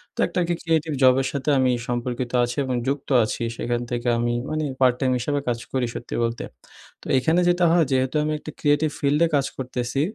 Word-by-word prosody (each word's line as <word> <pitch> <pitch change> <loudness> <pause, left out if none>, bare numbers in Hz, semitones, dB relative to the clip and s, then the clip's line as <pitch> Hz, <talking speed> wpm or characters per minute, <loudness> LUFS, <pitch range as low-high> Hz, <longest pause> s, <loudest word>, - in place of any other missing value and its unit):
তো - - -14
একটা - - -2
কি 175 - +1
creative 160 -2 0
job 130 0 +7
এর 130 - -1
সাথে 140 +1 -2
আমি 130 -1 +3 0.2
সম্পর্কিত 120 0 -3
আছি 120 +2 -3
এবং 130 -1 -1
যুক্ত 140 +1 -2
আছি। 115 +2 -3
সেখান 120 0 -1
থেকে 120 0 -2
আমি 120 0 0 0.2
মানে 155 0 -1 0.2
part 125 -1 +5
time 130 -2 +1
হিসাবে 145 +4 -1
কাজ 120 -1 0
করি 130 -2 +1
সত্যি - - -6
বলতে। 115 0 -2 0.6
তো - - -17
এখানে 160 +7 +2
যেটা 175 0 +3
হয় 170 -2 +4
যেহেতু 130 +2 +1
আমি 155 0 -1
একটা 155 - -8
creative 145 0 +2
field 145 +1 +1
এ - - +1
কাজ 140 -1 +2
করতেছি, 125 +1 -2
130 Hz, 215 wpm, -23 LUFS, 120-150 Hz, 0.6 s, job